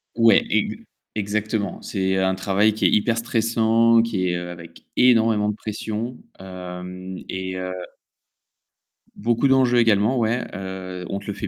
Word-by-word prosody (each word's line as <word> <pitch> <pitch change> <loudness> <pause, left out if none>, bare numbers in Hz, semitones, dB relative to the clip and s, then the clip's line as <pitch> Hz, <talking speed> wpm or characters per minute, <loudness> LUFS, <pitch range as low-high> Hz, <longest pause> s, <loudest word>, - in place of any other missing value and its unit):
Ouais, 115 -2 +5
ex - - +1 0.4
exactement. 105 0 -2
C'est 95 -1 -1
un 95 0 +1
travail 100 +3 +2
qui 110 - -1
est - - +6
hyper 115 +2 +2
stressant, 115 0 +3
qui 100 -6 -1
est, 90 - 0
heu, 90 0 -5
avec 85 -1 -11
énormément 115 -4 +4
de 105 - -2
pression, 110 +3 -5 0.2
hem, 90 0 -8
et 95 0 -4
heu 90 0 -4 1.4
Beaucoup 120 +4 +1
d'enjeux 130 -2 +4
également 110 +2 +3
ouais, 120 +1 +1
heu, 95 -1 -6
on 100 - -2
te 100 - -14
le 100 - -2
fait 105 - -5
105 Hz, 150 wpm, -22 LUFS, 95-115 Hz, 1.4 s, est